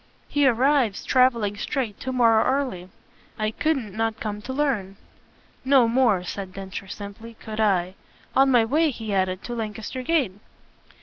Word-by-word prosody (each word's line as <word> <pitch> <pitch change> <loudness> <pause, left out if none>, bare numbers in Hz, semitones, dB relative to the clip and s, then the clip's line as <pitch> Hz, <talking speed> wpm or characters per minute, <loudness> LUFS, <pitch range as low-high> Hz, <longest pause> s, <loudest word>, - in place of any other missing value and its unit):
"He 290 -2 +2
arrives, 255 -3 +2
travelling 235 -6 +2
straight, 225 -1 -3
to 260 - -4
morrow 230 -3 +4
early. 255 -10 -1 0.5
I 215 -1 -1
couldn't 250 -7 -1
not 225 0 -1
come 210 -1 -4
to 250 - -6
learn." 250 -9 -1 0.7
"No 265 -3 +5
more," 230 -6 +2
said 185 +1 -6
Densher 195 0 -7
simply, 205 +4 -9
"could 220 -1 -8
I. 185 -4 +2 0.4
On 270 +1 +5
my 240 -3 +4
way," 310 +7 +2
he 225 -5 -5
added, 185 -1 0
"to 240 - -5
Lancaster 220 +2 -5
Gate." 265 - +1
225 Hz, 150 wpm, -24 LUFS, 200-260 Hz, 0.7 s, No